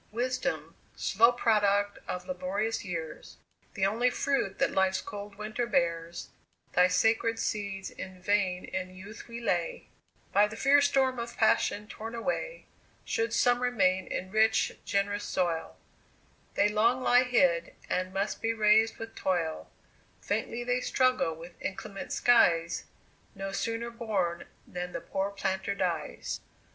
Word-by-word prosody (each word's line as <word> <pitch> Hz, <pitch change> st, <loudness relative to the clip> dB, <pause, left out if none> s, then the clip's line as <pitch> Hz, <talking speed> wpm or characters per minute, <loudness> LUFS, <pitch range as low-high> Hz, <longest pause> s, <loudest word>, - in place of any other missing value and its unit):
"Wisdom, 250 Hz, +3 st, -2 dB, 0.2 s
slow 230 Hz, +4 st, +4 dB
product 205 Hz, -4 st, +2 dB
of 180 Hz, 0 st, -4 dB
laborious 190 Hz, +5 st, -2 dB
years, 165 Hz, -5 st, -6 dB, 0.4 s
The 190 Hz, -, +1 dB
only 230 Hz, +5 st, +2 dB
fruit 250 Hz, -6 st, -1 dB
that -, -, +2 dB
life's 190 Hz, 0 st, +2 dB
cold 205 Hz, 0 st, -8 dB
winter 215 Hz, +3 st, -3 dB
bears, 170 Hz, -5 st, -1 dB, 0.4 s
Thy 180 Hz, 0 st, +6 dB
sacred 225 Hz, +4 st, +2 dB
seeds 200 Hz, -3 st, -3 dB
in 185 Hz, -1 st, -9 dB
vain 185 Hz, -1 st, +1 dB
in 185 Hz, 0 st, -5 dB
youth 200 Hz, +4 st, -10 dB
we 235 Hz, 0 st, -7 dB
lay, -, -, -1 dB, 0.4 s
By 205 Hz, +1 st, +5 dB
the 215 Hz, -, -8 dB
fierce 280 Hz, +4 st, +5 dB
storm 265 Hz, -3 st, +2 dB
of 235 Hz, 0 st, -6 dB
passion 210 Hz, -1 st, +2 dB
torn 225 Hz, +2 st, -7 dB
away; 275 Hz, -, -3 dB, 0.4 s
Should 230 Hz, 0 st, 0 dB
some 245 Hz, +1 st, +3 dB
remain 190 Hz, -7 st, +2 dB
in 185 Hz, +1 st, -4 dB
rich, 220 Hz, +1 st, +3 dB
gen'rous 205 Hz, +1 st, 0 dB
soil, 170 Hz, -5 st, -1 dB, 0.8 s
They -, -, +4 dB
long 230 Hz, +5 st, +2 dB
lie 245 Hz, 0 st, +6 dB
hid, 180 Hz, -9 st, +2 dB
and 185 Hz, 0 st, -1 dB
must 195 Hz, +2 st, -2 dB
be 225 Hz, 0 st, +1 dB
raised 220 Hz, +1 st, +4 dB
with 225 Hz, 0 st, -7 dB
toil; 170 Hz, -4 st, -1 dB, 0.5 s
Faintly 240 Hz, +1 st, -2 dB
they 245 Hz, +1 st, 0 dB
struggle 255 Hz, -13 st, +2 dB
with 170 Hz, +2 st, -12 dB
inclement 195 Hz, +1 st, -5 dB
skies, 170 Hz, -8 st, +3 dB, 0.5 s
No 195 Hz, 0 st, -4 dB
sooner 230 Hz, +3 st, -2 dB
born 200 Hz, -7 st, -2 dB, 0.2 s
than 180 Hz, 0 st, -6 dB
the 170 Hz, -, -4 dB
poor 195 Hz, +1 st, -2 dB
planter 195 Hz, 0 st, -2 dB
dies." 175 Hz, -6 st, -2 dB
205 Hz, 140 wpm, -29 LUFS, 185-230 Hz, 0.8 s, Thy